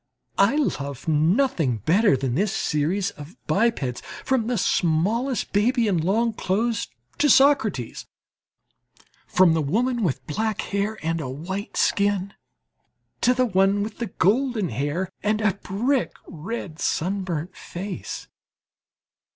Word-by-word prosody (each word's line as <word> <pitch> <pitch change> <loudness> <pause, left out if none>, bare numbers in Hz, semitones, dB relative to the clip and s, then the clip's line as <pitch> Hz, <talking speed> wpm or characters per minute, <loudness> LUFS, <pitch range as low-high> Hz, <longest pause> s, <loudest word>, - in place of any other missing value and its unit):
I 200 +8 +5
love 140 - -2
nothing 160 - +2
better 190 -2 +4
than 130 -2 -2
this 195 +8 +1
series 185 +1 0
of 150 +5 -12
bipeds, 195 - 0 0.2
from 260 -4 +1
the 245 -1 0
smallest 200 +10 +1
baby 230 +3 +2
in 185 -5 +2
long 220 +8 +1
clothes 220 +4 -1 0.3
to 295 - +4
Socrates, 265 - +3 1.2
from 180 -3 +4
the 160 - +1
woman 235 - 0
with 170 -10 -1
black 215 +7 -1
hair 200 +2 -2
and 165 0 -1
a 130 - -4
white 185 +9 -5
skin 200 -1 +1 0.9
to 250 - +4
the 255 0 +3
one 195 -1 +2
with 220 -1 -6
golden 220 - +2
hair 145 - -2
and 215 +1 +1
a 210 -3 +2
brick 235 +8 -1
red 170 0 -6
sun 190 +5 0
burnt 175 0 -4
face. 185 +1 -6
200 Hz, 125 wpm, -24 LUFS, 165-225 Hz, 1.2 s, I